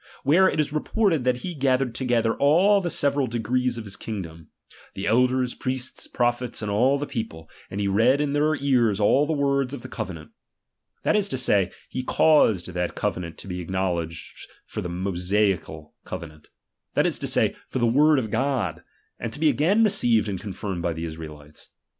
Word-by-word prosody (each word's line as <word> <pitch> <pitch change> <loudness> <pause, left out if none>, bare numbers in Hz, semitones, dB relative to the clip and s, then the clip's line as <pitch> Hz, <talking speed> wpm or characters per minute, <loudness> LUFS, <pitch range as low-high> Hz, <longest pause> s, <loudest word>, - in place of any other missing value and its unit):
where 180 +7 +5
it - - -3
is 150 -1 0
reported 165 - +1
that 125 -1 +1
he 180 - -3
gathered 135 -4 +1
together 120 -3 +1
all 185 +8 +4
the 175 - -2
several 140 -3 +1
degrees 120 +2 -1
of 115 - -5
his 100 -2 -6
kingdom, 85 -7 -7 0.5
the 95 - -4
elders, 125 +2 +2
priests, 130 -1 -3
prophets, 120 -1 -1
and 105 - -2
all 125 +7 +3
the 145 - -3
people: 110 - -6 0.2
and 95 - -5
he 100 - 0
read 115 +8 +3
in 145 -1 0
their 150 +1 +2
ears 125 -8 +2
all 135 +8 +3
the - - -1
words 140 -2 0
of 125 - -10
the - - -6
covenant; 85 -4 -7 0.7
that - - +2
is 205 -1 +1
to 130 - -2
say, 100 -7 +3 0.2
he 130 - -4
caused 125 - +3
that 90 0 -3
covenant 85 -2 -3
to - - -10
be 90 -1 -4
acknowledged 85 -2 -4 0.2
for - - -5
the 90 - -4
Mosaical 90 -3 -1
covenant; 80 -4 -8 0.5
that - - +3
is - - 0
to - - -3
say, - - +2
for - - -3
the 120 - +2
word 145 +6 +4
of 110 -5 -2
God; 130 -1 -1 0.4
and 115 - -4
to 150 - -7
be 155 -1 +4
again 190 +11 +3
received 120 - +3
and 95 -3 -3
confirmed 95 -3 -5
by 85 0 -1
the 80 +1 -5
Israelites. 75 -2 -10
120 Hz, 190 wpm, -24 LUFS, 95-140 Hz, 0.7 s, where